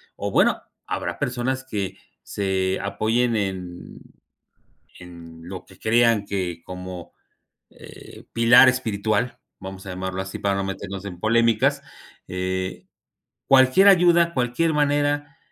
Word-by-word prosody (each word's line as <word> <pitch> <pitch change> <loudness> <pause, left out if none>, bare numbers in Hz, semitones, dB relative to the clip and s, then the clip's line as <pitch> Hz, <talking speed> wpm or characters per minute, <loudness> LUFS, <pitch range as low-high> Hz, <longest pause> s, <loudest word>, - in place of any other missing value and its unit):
o, - - -4
bueno, - - +3 0.3
habrá - - -3
personas 130 +1 -2
que 100 -5 -4 0.3
se 95 -1 -1
apoyen 115 +4 0
en 90 -3 -5 1.0
en 85 -2 -12
lo 95 0 -8
que 95 - -18
crean 115 -2 +2
que 90 -4 -3
como, 90 -1 -8 0.6
eh, - - -14
pilar 120 +3 +7
espiritual 110 -1 -1 0.2
vamos 95 0 -9
a - - -7
llamarlo 95 +1 -4
así 95 0 -7
para 100 -1 0
no 100 - -1
meternos 95 0 -6
en 90 -3 -8
polémicas, 115 +1 +2 0.5
eh, 95 0 -4 0.6
cualquier 135 +9 +5
ayuda, 175 -2 +4
cualquier 130 +5 0
manera, 145 0 0
100 Hz, 120 wpm, -23 LUFS, 95-125 Hz, 1.0 s, pilar